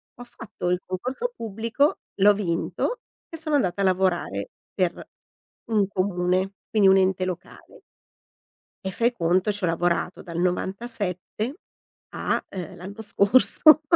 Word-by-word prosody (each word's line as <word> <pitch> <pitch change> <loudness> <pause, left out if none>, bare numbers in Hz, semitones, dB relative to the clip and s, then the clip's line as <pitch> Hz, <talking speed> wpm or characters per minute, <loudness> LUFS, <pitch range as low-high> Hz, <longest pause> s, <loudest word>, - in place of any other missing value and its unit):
Ho 245 - -9
fatto 220 -6 -6
il 180 0 +1
concorso 255 - -3
pubblico, 230 +7 0 0.2
l'ho 205 +1 +6
vinto 205 - -2 0.3
e 330 - -7
sono 310 -2 0
andata 200 -8 +1
a - - +3
lavorare 180 - 0 0.2
per 180 -3 +1 0.8
un 205 -3 +3
comune, 185 -1 0 0.2
quindi 210 -3 +5
un 190 - +7
ente 190 -1 +2
locale 185 -2 -8 1.1
e - - -2
fai 235 +5 +2
conto 185 0 +1
c'ho 205 -2 -1
lavorato 175 +2 0
dal 170 -1 -5
'97 195 - -2 0.6
a, - - -1
ehm, 180 -4 -6
l'anno 200 +5 -8
scorso. 255 +9 +5
195 Hz, 130 wpm, -25 LUFS, 180-225 Hz, 1.1 s, un